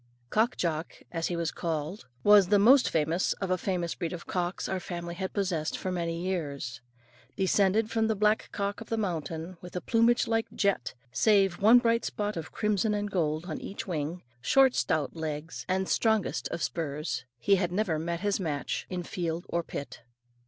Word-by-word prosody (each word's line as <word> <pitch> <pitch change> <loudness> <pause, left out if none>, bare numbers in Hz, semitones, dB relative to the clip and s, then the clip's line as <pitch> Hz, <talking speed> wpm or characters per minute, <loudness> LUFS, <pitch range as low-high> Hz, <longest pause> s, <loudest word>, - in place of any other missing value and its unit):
Cock 225 +3 +2
Jock, 165 -2 -2 0.2
as 165 -1 -1
he 175 - -2
was 170 -1 -1
called, 165 +3 -3 0.2
was 205 -2 +7
the 205 - +5
most 250 +6 +6
famous 160 +3 +1
of 195 -2 -4
a - - +4
famous 175 -2 -1
breed 170 0 -4
of 175 - -7
cocks, 180 0 -2
our 190 - -1
family 170 -1 -5
had 190 +2 -4
possessed 180 -6 -1
for 185 - -3
many 170 -2 -2
years. 145 -10 -3 0.5
Descended 200 +3 +2
from 225 -1 +2
the 220 - +1
black 210 +2 +2
cock 200 +1 -2
of 225 - -9
the 225 - 0
mountain, 170 -3 -3
with 180 0 -7
plumage 235 +1 +4
like 225 0 +1
jet, 200 - 0 0.2
save 195 - +3
one 220 +4 +8
bright 230 -1 +2
spot 210 0 -2
of 165 -1 -5
crimson 210 0 +1
and 205 0 -2
gold 155 -3 0
on 160 -4 -5
each 200 - -6
wing, 165 0 -3 0.2
short 265 - +5
stout 155 -1 0
legs, 160 0 -5
and 190 0 +1
strongest 220 -3 +1
of 170 - -4
spurs, 150 -5 -3
he 195 +11 +3
had 175 -2 0
never 180 -5 0
met 170 +1 -3
his 205 0 +1
match 150 -6 -2
in 180 -1 -3
field 170 0 -3
or 170 - 0
pit. 145 -3 -7
180 Hz, 185 wpm, -29 LUFS, 165-205 Hz, 0.5 s, one